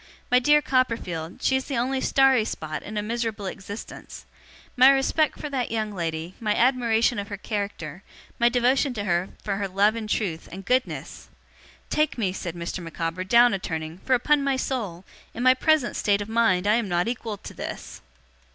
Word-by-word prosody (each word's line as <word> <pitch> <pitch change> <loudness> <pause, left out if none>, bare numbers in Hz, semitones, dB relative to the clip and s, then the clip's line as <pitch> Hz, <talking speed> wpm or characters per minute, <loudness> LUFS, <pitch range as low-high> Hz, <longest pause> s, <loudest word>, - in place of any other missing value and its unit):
My 250 - +6
dear 295 +3 +4
Copperfield, 225 -11 -1
she 265 - +3
is 265 - -1
the 275 - -3
only 260 +2 0
starry 270 -4 +4
spot 155 -7 -5
in 210 +1 -7
a 210 - -1
miserable 225 -2 -3
existence. 200 +2 -8 0.5
My 255 +1 +8
respect 275 +3 +2
for - - -4
that 255 -3 -1
young 215 -2 -2
lady, 165 -1 -4
my 210 -3 0
admiration 235 -2 +2
of 200 - -5
her 200 - -6
character, 200 -6 -4 0.4
my 235 0 +5
devotion 250 +2 +2
to 205 - -3
her 175 -1 0
for 200 -2 -2
her 200 0 -2
love 200 +3 +2
and 220 -2 -5
truth, 180 -7 -2
and 190 +2 -8
goodness! 255 +3 -2 0.6
Take 305 -3 +1
me,' 195 -6 0
said 175 -3 -5
Mr. 170 +2 -4
Micawber, 165 +1 -4
'down 235 +5 +5
a 195 - -1
turning, 160 -1 -5
for, 260 - +2
upon 285 +3 +2
my 275 -1 +1
soul, 210 -10 -3 0.3
in 240 - -3
my 255 0 +7
present 290 -1 +2
state 205 -1 +2
of 205 - -4
mind 220 -5 +2
I 210 +2 +4
am 230 -4 -2
not 175 +2 +1
equal 230 -3 -3
to - - -10
this! - - -7
220 Hz, 190 wpm, -25 LUFS, 185-250 Hz, 0.6 s, My